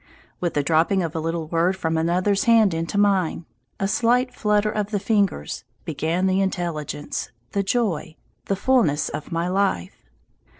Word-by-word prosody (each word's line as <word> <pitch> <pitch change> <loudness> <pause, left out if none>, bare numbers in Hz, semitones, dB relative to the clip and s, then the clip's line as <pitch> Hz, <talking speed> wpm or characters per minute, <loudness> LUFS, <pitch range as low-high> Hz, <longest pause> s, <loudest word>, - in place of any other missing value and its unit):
With 175 -2 -2
the 145 - +2
dropping 165 +5 +2
of 165 0 -4
a - - 0
little 165 0 -2
word 170 +4 +1
from 160 -3 -1
another's 180 +5 +1
hand 225 -5 +5
into 165 +4 -2
mine, 190 -5 +2 0.3
a 195 - +1
slight 245 +4 +2
flutter 210 -2 +1
of 210 -1 -2
the 210 -2 -1
fingers, 200 - 0 0.2
began 165 +3 -1
the 190 +1 +2
intelligence, 170 -8 -3 0.2
the 200 - 0
joy, 195 -7 -1 0.3
the 195 - 0
fullness 195 - +2
of 150 - -6
my 170 +1 -1
life. 180 - -1
185 Hz, 160 wpm, -23 LUFS, 165-205 Hz, 0.3 s, hand